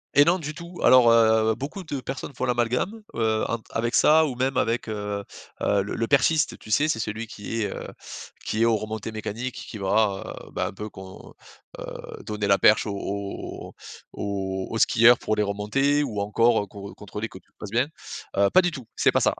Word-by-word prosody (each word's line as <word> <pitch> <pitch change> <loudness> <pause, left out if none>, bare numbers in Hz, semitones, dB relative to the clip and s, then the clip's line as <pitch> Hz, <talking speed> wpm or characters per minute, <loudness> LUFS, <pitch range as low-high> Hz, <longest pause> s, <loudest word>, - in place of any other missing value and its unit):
Et 145 - +7
non, 175 +2 +4
du 155 -3 -5
tout, 170 +3 -10
alors 125 -2 +7
heu, 110 -1 +4
beaucoup 150 +8 -6
de 145 -5 -4
personnes 135 0 -6
font 130 - -2
l'amalgame, 125 - 0
heu, 110 -1 +1
entre 115 -1 -3
avec 115 +1 0
ça 155 +1 +5
ou 130 - -4
même 130 +1 0
avec, 115 +1 0
heu 105 -1 -3 0.4
heu, 100 -1 +2
le 100 - -4
le 115 - -1
perchiste, 150 +3 +2
tu - - -14
sais, 145 +8 +3
c'est 115 - 0
celui 110 +1 -3
qui 110 +1 -5
est, - - -2
heu, - - -7 0.6
qui 110 - -1
est 115 - +5
aux 115 - +4
remontées 110 +1 -5
mécaniques, 110 +3 -5
qui 110 - -8
va, 100 0 0
heu, - - -15
bah, - - -1
un - - -7
peu 105 +2 -6
qu'on 95 -1 -12 0.5
heu, - - -5 0.4
donner 105 -1 -3
la 100 0 +4
perche 110 - +5
aux 100 - -3
aux 100 0 -5 0.4
aux 95 -2 -3
aux 115 - -3
skieurs 115 +2 +6
pour 110 - -1
les 105 - +1
remontées 105 +9 +1
ou 105 -7 -3
encore, 115 +3 +3
heu, - - -10
con 100 0 -9
contrôler 105 +2 -6
que 95 - -12
tu - - -34
te - - -55
poses 105 - -8
bien. 125 +5 +2 0.5
Heu, 100 0 +4
pas 185 - +7
du 175 - +1
tout, 135 -8 -9
c'est - - +3
pas - - +2
ça. - - +2
110 Hz, 220 wpm, -25 LUFS, 105-130 Hz, 0.6 s, Et